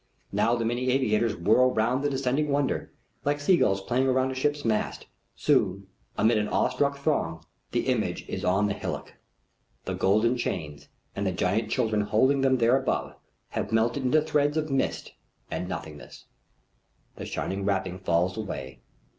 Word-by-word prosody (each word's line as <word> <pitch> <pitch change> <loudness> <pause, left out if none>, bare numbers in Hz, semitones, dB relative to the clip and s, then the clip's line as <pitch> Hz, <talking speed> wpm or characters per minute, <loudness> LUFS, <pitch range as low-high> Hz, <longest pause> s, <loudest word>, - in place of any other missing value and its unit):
Now 115 +1 +2
the 115 -1 -2
many 120 +2 -1
aviators 115 -4 +2
whirl 120 +8 +3
round 120 +5 +1
the 145 - +2
descending 135 +2 0
wonder, 140 -1 0 0.3
like 145 +1 0
seagulls 145 - +3
playing 130 +6 +1
about 130 0 +2
a - - -3
ship's 145 +2 -1
mast. 110 -2 -1 0.3
Soon, 95 +1 +1 0.3
amid 110 0 +3
an 105 - -1
awestruck 140 +6 +1
throng, 85 - -1 0.3
the - - 0
image - - -1
is - - -4
on 95 +3 +2
the 105 - 0
hillock. - - -5 0.7
The - - -2
golden 110 +6 +2
chains, 75 -10 -4 0.3
and 100 0 -1
the - - +1
giant 90 +5 0
children 110 -4 +1
holding 130 +7 +2
them 135 -1 +3
there 120 +2 +4
above, 130 - -2 0.4
have - - -3
melted 115 +5 +1
into 150 +4 +3
threads 150 -1 +1
of 155 -2 -1
mist 135 - -1 0.4
and 90 - -3
nothingness. 75 -5 -8 0.9
The - - -6
shining 95 +1 -3
wrapping 95 -2 -1
falls 90 0 +1
away. 70 -11 -6
115 Hz, 160 wpm, -27 LUFS, 100-135 Hz, 0.9 s, there